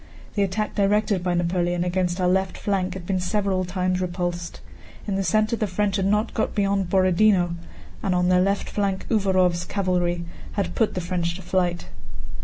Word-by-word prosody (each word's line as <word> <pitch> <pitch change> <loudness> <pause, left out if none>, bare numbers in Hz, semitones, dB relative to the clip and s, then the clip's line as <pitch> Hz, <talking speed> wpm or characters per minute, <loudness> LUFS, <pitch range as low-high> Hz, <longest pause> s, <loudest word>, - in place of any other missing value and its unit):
The 205 - 0
attack 200 +2 -1
directed 205 -1 +2
by 180 -1 0
Napoleon 175 0 0
against 180 0 -1
our 180 - +2
left 190 +1 +1
flank 190 -2 -1
had 185 -2 -7
been 185 0 0
several 190 0 0
times 185 0 -1
repulsed. 175 -1 -3 0.5
In 200 - -1
the 195 0 0
center 215 +5 +2
the 215 -2 -1
French 200 +1 0
had 190 -1 +1
not 210 +3 +1
got 220 - -1
beyond 195 -2 +1
Borodinó, 185 -1 +3 0.5
and 185 -2 0
on 180 0 +2
their 180 0 +4
left 195 +2 0
flank 195 -2 -1
Uvárov's 185 -5 +2
cavalry 175 -2 -1 0.3
had 200 - -2
put 225 - +1
the 180 - -1
French 170 -1 -2
to 185 - -9
flight. 175 -1 0
185 Hz, 180 wpm, -24 LUFS, 180-200 Hz, 0.5 s, their